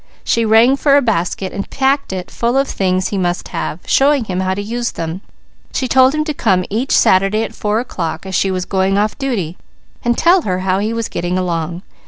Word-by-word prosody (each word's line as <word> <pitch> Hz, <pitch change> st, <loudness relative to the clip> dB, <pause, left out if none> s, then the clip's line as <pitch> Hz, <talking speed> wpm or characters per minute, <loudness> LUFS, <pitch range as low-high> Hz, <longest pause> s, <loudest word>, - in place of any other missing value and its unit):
She 230 Hz, -1 st, +1 dB
rang 225 Hz, +5 st, +5 dB
for 280 Hz, 0 st, +4 dB
a -, -, +4 dB
basket 190 Hz, -3 st, -1 dB
and 200 Hz, -, -5 dB
packed 275 Hz, -1 st, 0 dB
it 185 Hz, -1 st, -5 dB
full 240 Hz, +2 st, 0 dB
of 275 Hz, 0 st, +2 dB
things 185 Hz, -1 st, 0 dB
he 200 Hz, -, -2 dB
must 175 Hz, -1 st, -2 dB
have, 165 Hz, -, -4 dB
showing 280 Hz, -1 st, +3 dB
him 185 Hz, -4 st, -3 dB
how 190 Hz, 0 st, 0 dB
to 200 Hz, -, -3 dB
use 235 Hz, +3 st, -3 dB
them. 165 Hz, +3 st, -5 dB, 0.5 s
She 260 Hz, -, 0 dB
told 260 Hz, +3 st, +4 dB
him 305 Hz, -, +1 dB
to 305 Hz, 0 st, -3 dB
come 190 Hz, -9 st, +1 dB
each 235 Hz, +6 st, -1 dB
Saturday 195 Hz, +4 st, +3 dB
at -, -, -6 dB
four 210 Hz, +1 st, -1 dB
o'clock, 165 Hz, -9 st, -4 dB
as 190 Hz, -, -6 dB
she 195 Hz, -, +2 dB
was 185 Hz, -1 st, -2 dB
going 190 Hz, 0 st, +1 dB
off 210 Hz, +1 st, 0 dB
duty, 205 Hz, -, -2 dB, 0.5 s
and 240 Hz, 0 st, +1 dB
tell 355 Hz, +2 st, +4 dB
her 185 Hz, -, -2 dB
how 190 Hz, 0 st, +1 dB
he 215 Hz, +2 st, -1 dB
was 230 Hz, -1 st, -2 dB
getting 175 Hz, +1 st, -2 dB
along. 170 Hz, -1 st, -2 dB
200 Hz, 220 wpm, -17 LUFS, 185-245 Hz, 0.5 s, rang